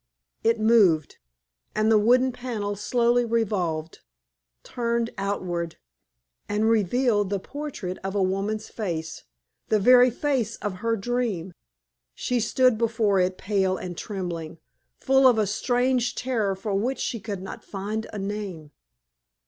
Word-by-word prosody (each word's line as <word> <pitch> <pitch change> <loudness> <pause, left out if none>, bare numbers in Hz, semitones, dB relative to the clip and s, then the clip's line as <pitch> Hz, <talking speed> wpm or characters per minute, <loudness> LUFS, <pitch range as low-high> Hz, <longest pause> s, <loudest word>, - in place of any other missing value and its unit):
It 230 0 +2
moved, 205 -9 +4 0.6
and 215 +1 +2
the 215 - +6
wooden 250 +4 +4
panel 225 -5 -4
slowly 240 +3 +2
revolved, 190 -9 -1 0.6
turned 235 -1 -1
outward, 180 -4 -3 0.7
and 210 +2 +1
revealed 220 -1 +2
the 200 - 0
portrait 240 -6 -6
of 195 +1 -3
a 200 - +2
woman's 200 +3 -1
face 170 -9 -5 0.4
the 215 - +3
very 250 +4 +7
face 245 -3 -1
of 200 -3 -4
her 230 0 +1
dream. 210 -5 -2 0.6
She 250 -1 -1
stood 250 0 +3
before 225 -4 +2
it 185 0 +1
pale 190 -2 0
and 180 -1 -6
trembling, 175 -5 -5 0.4
full 265 0 +5
of 245 -3 +5
a 215 - +3
strange 245 +3 +1
terror 225 -6 -1
for 200 +2 -4
which 235 +7 0
she 230 - -3
could 200 -3 -5
not 190 - -8
find 210 +3 -4
a 215 - -6
name. 195 -6 -5
215 Hz, 135 wpm, -25 LUFS, 190-240 Hz, 0.7 s, very